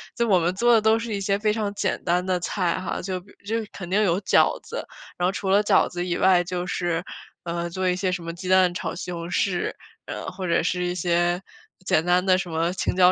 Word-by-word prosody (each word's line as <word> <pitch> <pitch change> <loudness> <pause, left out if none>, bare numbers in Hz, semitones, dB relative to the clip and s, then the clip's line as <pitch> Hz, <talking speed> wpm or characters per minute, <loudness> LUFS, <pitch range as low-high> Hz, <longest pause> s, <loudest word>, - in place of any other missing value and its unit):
就 235 - +1
我 190 -3 +5
们 175 +2 0
做 240 +4 +4
的 225 - +5
都 220 +1 +4
是 230 -1 -4
一 200 - -1
些 195 0 +1
非 210 +1 +1
常 210 -2 -2
简 200 -2 -1
单 180 +1 +1
的 185 -1 0
菜 180 0 -1
哈， 185 - -3
就 185 0 -3
比 195 +3 -19
就 220 +3 -1 0.2
肯 175 -3 -7
定 200 +3 +2
有 180 -2 +2
饺 - - +3
子。 - - -6 0.3
然 175 - +1
后 - - +1
除 195 -1 -3
了 200 +2 +5
饺 - - +3
子 175 0 -4
以 175 - 0
外， 185 -1 +5
就 175 0 -3
是， 175 -2 -1 0.4
呃， 170 0 -3
做 185 +2 -1
一 180 - +1
些 185 0 0
什 180 -2 -3
么 165 - -4
鸡 180 +2 -8
蛋 185 -1 +4
炒 - - -3
西 180 0 -6
红 170 0 -5
柿， 185 -2 0 0.3
呃， - - -6
或 185 0 -5
者 170 -1 +2
是 180 +1 0
一 175 0 -2
些 175 0 +1 0.4
简 160 - +2
单 180 +1 +3
的 185 -1 +4
什 185 -2 -4
么 165 +1 0
青 185 - -1
椒 185 0 +6
180 Hz, 270 characters per minute, -24 LUFS, 175-195 Hz, 0.4 s, 椒